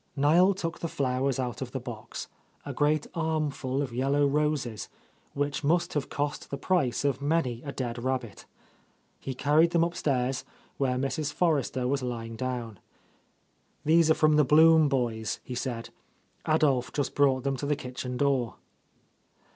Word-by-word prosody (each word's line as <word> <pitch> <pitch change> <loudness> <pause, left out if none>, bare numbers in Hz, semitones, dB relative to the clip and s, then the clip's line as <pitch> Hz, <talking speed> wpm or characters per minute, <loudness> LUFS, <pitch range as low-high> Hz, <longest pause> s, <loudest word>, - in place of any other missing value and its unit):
Niel 170 +7 +4
took 165 -3 -4
the 170 - -2
flowers 135 -2 0
out 120 -5 -3
of - - -5
the - - -2
box, - - -7 0.4
a - - -5
great 150 0 +1
armful 155 -5 -1
of 125 -4 -6
yellow 140 +3 +2
roses, 140 -6 -1 0.5
which 145 +2 -1
must 170 +4 +1
have 145 -2 -2
cost 145 0 -3
the 140 - -4
price 140 -6 0
of 140 -1 0
many 140 -6 0
a 140 - -6
dead 120 -3 -4
rabbit. 130 -5 -3 0.7
He 130 - -5
carried 155 +5 +3
them 170 -1 +4
upstairs, 135 -6 -1 0.3
where 130 -2 0
Mrs. 140 +3 -2
Forrester 145 -7 0
was 140 +1 0
lying 115 -2 -4
down. 120 -4 -4 1.1
"These 160 +1 +5
are 160 - +5
from 155 -1 +4
the 150 - +6
Blum 160 +2 +6
boys," 115 -5 -1
he 125 - -7
said. 120 -2 -4 0.6
"Adolph 145 -5 +2
just 145 - -2
brought 135 -3 +3
them 140 -1 0
to 140 - -4
the 150 - +2
kitchen 125 -1 -5
door." 135 -4 +1
140 Hz, 155 wpm, -28 LUFS, 125-155 Hz, 1.1 s, the